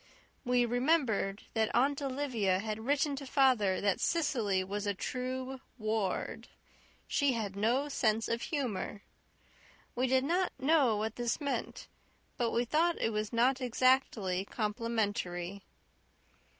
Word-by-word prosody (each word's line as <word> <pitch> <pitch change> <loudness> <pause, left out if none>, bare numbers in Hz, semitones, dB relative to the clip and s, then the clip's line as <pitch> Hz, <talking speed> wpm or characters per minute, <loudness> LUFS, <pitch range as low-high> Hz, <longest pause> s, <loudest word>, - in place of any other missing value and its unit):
We 245 -1 +3
remembered 245 -6 +1
that 220 -1 +1
Aunt 280 +4 +2
Olivia 255 -9 0
had 220 +3 -4
written 285 0 +2
to 275 -1 -7
father 250 -9 +3
that 200 -2 +1
Cecily 230 - +1
was 205 +2 -4
a 200 - 0
true 255 +4 -4 0.2
Ward 215 -4 -2 0.6
she 285 -3 +2
had 210 -4 -3
no 240 +8 +1
sense 225 -6 +1
of 230 0 -1
humour. 210 - -3 0.9
We 255 +2 0
did 260 +1 +3
not 355 +5 +1
know 270 -5 +3
what 220 +1 -3
this 240 -2 -1
meant, 280 -2 -3 0.5
but 240 -4 0
we 235 +2 0
thought 330 +6 +2
it 225 - 0
was 215 0 -2
not 250 +3 +2
exactly 245 -7 +2
complimentary. 205 -4 -2
235 Hz, 130 wpm, -32 LUFS, 210-270 Hz, 0.9 s, We